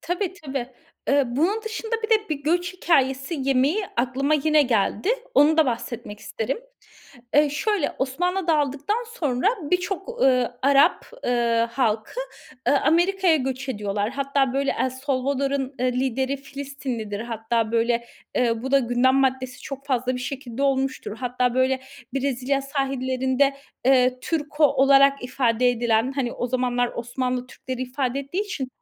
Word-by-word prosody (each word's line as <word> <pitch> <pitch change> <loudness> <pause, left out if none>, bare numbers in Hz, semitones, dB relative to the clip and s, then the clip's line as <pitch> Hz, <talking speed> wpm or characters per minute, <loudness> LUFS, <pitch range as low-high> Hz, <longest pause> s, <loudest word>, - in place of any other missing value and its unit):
Tabii, 355 +2 -2
tabii. 270 -3 -3 0.4
Eee, 280 0 +4
bunun 335 - 0
dışında 445 0 -5
bir 440 - -3
de 430 -1 +3
bir 295 -3 -3
göç 350 +4 0
hikâyesi 270 -4 +1
yemeği 275 +9 +2
aklıma 265 +4 +1
yine 305 0 +4
geldi. 225 - 0 0.3
Onu 315 -6 +5
da 320 -2 +5
bahsetmek 230 -3 -4
isterim. 225 - -3 0.8
Eee, 295 0 +5
şöyle 370 +2 0
Osmanlı 355 +8 -1
dağıldıktan 300 - +1
sonra 275 - -1 0.2
birçok, 360 +2 -1
ııı, 250 -2 +2
Arap, 280 +5 +4 0.2
ııı, 235 -1 +2
halkı, 230 - -1 0.5
ııı, 285 - +4
Amerika'ya 345 +2 +3
göç 265 -1 -3
ediyorlar. 205 -3 -2
Hatta 275 -1 0
böyle 275 +1 +1
El 260 - +1
Salvador'un, 270 +1 -1
ııı, 255 0 +2
lideri 260 +2 0
Filistinlidir. 275 -6 -5
Hatta 225 -1 -2
böyle, 235 +1 +1 0.3
eee, 230 -2 +1
bu 265 - -3
da 275 - +6
gündem 245 +1 +2
maddesi 260 -1 0
çok 275 0 -7
fazla 255 -1 0
bir 250 - -4
şekilde 265 0 -5
olmuştur. 265 -5 0
Hatta 250 0 -1
böyle 260 0 +2 0.3
Brezilya 270 0 0
sahillerinde, 270 0 0 0.3
eee, 255 -1 +4
"Turco" 300 +1 0
olarak 275 -1 +5
ifade 250 -1 +2
edilen, 235 +1 +1
hani 265 -3 -2
o 245 - -3
zamanlar 245 -1 0
Osmanlı 250 +1 -2
Türkleri 255 0 -6
ifade 255 0 -2
ettiği 295 +9 -3
için 295 -11 -4
265 Hz, 140 wpm, -24 LUFS, 250-285 Hz, 0.8 s, da